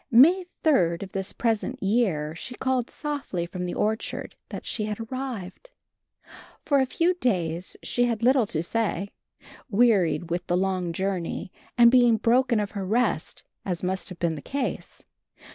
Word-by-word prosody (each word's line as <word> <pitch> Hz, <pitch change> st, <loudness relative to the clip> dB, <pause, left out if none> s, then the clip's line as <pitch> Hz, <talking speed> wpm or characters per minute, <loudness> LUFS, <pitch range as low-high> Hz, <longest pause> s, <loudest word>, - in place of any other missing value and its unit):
May 335 Hz, +10 st, +6 dB, 0.2 s
3d 175 Hz, -, +3 dB
of 190 Hz, -, -9 dB
this 195 Hz, 0 st, -4 dB
present 235 Hz, +3 st, -1 dB
year 195 Hz, -8 st, +1 dB
she 245 Hz, +9 st, -8 dB
called 260 Hz, -2 st, 0 dB
softly 285 Hz, -, -3 dB
from 180 Hz, +1 st, -5 dB
the 175 Hz, -, -4 dB
orchard 220 Hz, +1 st, -2 dB
that -, -, -7 dB
she 215 Hz, -, -2 dB
had 210 Hz, 0 st, -4 dB
arrived. 240 Hz, -, -6 dB, 1.0 s
For 285 Hz, -2 st, +3 dB
a 265 Hz, -, +2 dB
few 335 Hz, +7 st, +2 dB
days 180 Hz, -, -1 dB
she 245 Hz, -, +1 dB
had 235 Hz, -1 st, -1 dB
little 255 Hz, -2 st, +4 dB
to 160 Hz, -3 st, -2 dB
say, 200 Hz, -1 st, -1 dB, 0.6 s
wearied 190 Hz, -8 st, +3 dB
with 175 Hz, +1 st, -2 dB
the 175 Hz, -, +2 dB
long 185 Hz, -2 st, 0 dB
journey 185 Hz, 0 st, -3 dB, 0.3 s
and 235 Hz, -1 st, +8 dB
being 245 Hz, -3 st, +5 dB
broken 240 Hz, 0 st, +3 dB
of 205 Hz, -1 st, -2 dB
her 200 Hz, -2 st, -4 dB
rest, 215 Hz, -3 st, 0 dB, 0.2 s
as 180 Hz, -2 st, -3 dB
must 190 Hz, +2 st, -2 dB
have 185 Hz, -, -9 dB
been 170 Hz, -2 st, 0 dB
the 150 Hz, -, -6 dB
case. 275 Hz, -, -4 dB
210 Hz, 160 wpm, -26 LUFS, 180-245 Hz, 1.0 s, and